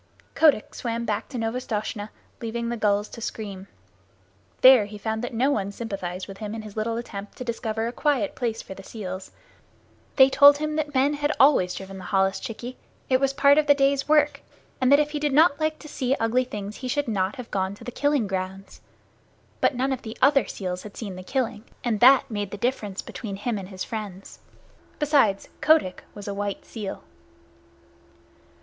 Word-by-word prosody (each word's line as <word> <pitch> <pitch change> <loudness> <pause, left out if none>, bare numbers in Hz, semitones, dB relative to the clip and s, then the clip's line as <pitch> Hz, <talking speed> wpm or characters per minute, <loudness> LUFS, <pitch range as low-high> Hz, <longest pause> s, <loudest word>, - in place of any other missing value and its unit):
Kotick 300 -9 +3
swam 235 -1 -3
back 210 -2 -2
to 260 - -6
Novastoshnah, 225 -2 -3 0.3
leaving 235 0 -3
the 240 - -1
gulls 210 -2 +1
to 230 - -10
scream. 200 -4 -6 0.9
There 255 -4 +8
he 210 +1 -9
found 220 +2 -3
that 245 - -3
no 250 +5 +2
one 200 -6 -1
sympathized 195 -4 -5
with 195 -1 -10
him 215 0 -5
in 220 - -6
his 210 -2 -10
little 225 +1 -1
attempt 205 -4 -7
to - - -5
discover 225 -2 -2
a 235 - -2
quiet 255 -5 0
place 230 -3 -3
for - - -8
the 195 - -11
seals. 190 -2 -7 0.9
They 265 -1 +8
told 285 +1 +7
him 305 +1 -2
that 300 -2 -2
men 275 +3 +3
had 290 0 0
always 260 -10 +5
driven 190 0 -8
the 185 - -9
holluschickie 215 +5 -1 0.3
it 255 -1 +4
was 275 0 +2
part 280 +1 +5
of 300 - 0
the 285 - +6
day's 275 0 +1
work 300 -1 +3 0.4
and 255 +1 +3
that 285 - +8
if 300 0 +1
he 300 - -2
did 295 -2 0
not 305 0 +5
like 310 0 0
to - - -12
see 265 -3 -1
ugly 240 +2 +1
things 210 -4 -6
he 255 - -5
should 290 +2 -1
not 195 -3 0
have 250 -2 -9
gone 190 0 -1
to - - -14
the 245 - -6
killing 285 -2 +1
grounds. 190 0 -5 0.8
But 280 - +2
none 265 +2 0
of 260 -1 -2
the 220 0 -8
other 275 +1 +4
seals 180 -2 -4
had 210 - -11
seen 200 -5 -5
the 185 - -7
killing, 230 +1 -2 0.2
and 230 -4 0
that 260 +1 +6
made 205 -2 -3
the 205 - -7
difference 210 -4 -2
between 205 -4 -6
him 210 +2 -2
and 190 -1 -8
his 190 -2 -5
friends. 205 -4 -7 0.6
Besides, 275 -10 +2
Kotick 310 - +3
was 205 -1 -9
a 200 - -2
white 200 0 -4
seal. 210 -4 -6
225 Hz, 195 wpm, -25 LUFS, 200-270 Hz, 0.9 s, There